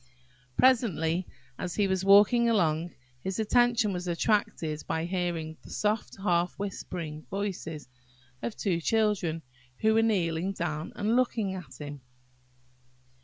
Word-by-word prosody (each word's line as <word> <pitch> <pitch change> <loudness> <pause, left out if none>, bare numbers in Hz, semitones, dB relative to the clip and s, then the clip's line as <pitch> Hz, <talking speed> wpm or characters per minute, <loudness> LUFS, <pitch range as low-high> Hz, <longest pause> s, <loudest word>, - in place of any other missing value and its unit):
Presently, 185 -9 +3 0.3
as 180 -2 -3
he 205 -2 +2
was 190 -1 0
walking 210 +5 +6
along, 170 -5 +1 0.3
his 190 -1 -2
attention 235 -1 +3
was 180 0 -4
attracted 170 -4 0
by 160 +1 -1
hearing 170 -3 -2
the - - -14
soft 210 +1 -1
half 175 -2 +1
whispering 170 -6 -5
voices 180 -7 -4 0.5
of 235 - -3
two 175 -5 0
children, 195 -6 +1 0.4
who 220 0 +4
were 225 - +4
kneeling 185 -4 +1
down 160 -4 -3
and 215 +3 +1
looking 230 -6 +1
at 185 -4 -9
him. 145 -2 -7
185 Hz, 125 wpm, -29 LUFS, 165-210 Hz, 0.5 s, walking